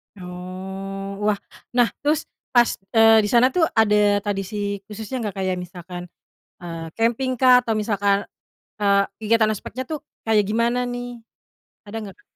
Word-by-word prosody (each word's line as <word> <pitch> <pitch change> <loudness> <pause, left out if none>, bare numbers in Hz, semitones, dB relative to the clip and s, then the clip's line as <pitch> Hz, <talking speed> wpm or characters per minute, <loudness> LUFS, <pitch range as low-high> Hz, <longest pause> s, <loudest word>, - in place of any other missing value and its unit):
Oh. 190 +2 -7
Wah. 205 -1 +2 0.4
Nah, 245 -2 +4
terus 300 +2 +1 0.3
pas, 240 -1 +6 0.3
eee, 225 0 +7
di - - -2
sana 245 +3 +5
tuh 325 +2 +3
ada 210 -2 +4
tradisi 200 0 -3
khususnya 220 +4 -5
nggak? 200 - -6
Kayak 185 -1 0
misalkan, 180 0 -8 0.6
eee, 165 -2 -6
camping-kah? 250 +2 +3
Atau 230 - 0
misalkan, 205 -2 +1 0.5
eee, 200 -1 +4 0.2
kegiatan 220 0 +3
aspeknya 225 +4 -5
tuh, 310 +2 -4 0.2
kayak 215 -3 +2
gimana 235 +3 +1
nih? 245 0 -5 0.7
Ada 210 - -7
nggak, 195 -2 -9
Kak? - - -24
210 Hz, 140 wpm, -22 LUFS, 195-235 Hz, 0.7 s, eee